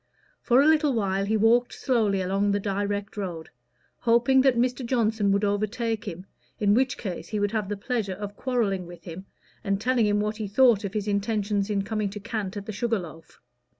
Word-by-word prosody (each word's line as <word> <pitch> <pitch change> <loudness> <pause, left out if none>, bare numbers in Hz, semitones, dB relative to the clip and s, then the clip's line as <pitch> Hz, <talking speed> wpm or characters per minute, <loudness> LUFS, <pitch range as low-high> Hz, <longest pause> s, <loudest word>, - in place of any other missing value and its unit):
For 255 +2 +4
a - - +2
little 305 -2 +4
while 195 -3 0
he 220 +2 +1
walked 235 +3 +3
slowly 215 -7 +1
along 195 +2 0
the 205 - +1
direct 200 +1 -2
road, 175 -5 -5 0.5
hoping 240 +3 +4
that 260 -2 +3
Mr. 250 +2 0
Johnson 225 -4 +1
would 200 +1 +1
overtake 215 +2 -1
him, 185 -2 -7 0.3
in 205 -1 +3
which 260 +3 +2
case 185 -6 -5
he 215 - -3
would 205 0 0
have 215 -3 -2
the 205 - -3
pleasure 205 -3 -2
of 205 +1 -7
quarrelling 210 -9 -1
with 175 -1 -12
him, 180 +3 -9 0.4
and 195 -2 0
telling 240 0 +2
him 205 0 +2
what 210 +1 -2
he 215 -2 -4
thought 225 0 +4
of 200 0 -5
his 210 -1 -2
intentions 205 0 0
in 200 -2 0
coming 215 -1 -2
to 210 +2 -7
cant 210 -2 -4
at 200 - -6
the 215 - -5
Sugar 225 +2 0
Loaf. 165 -3 -10
210 Hz, 205 wpm, -26 LUFS, 200-230 Hz, 0.5 s, For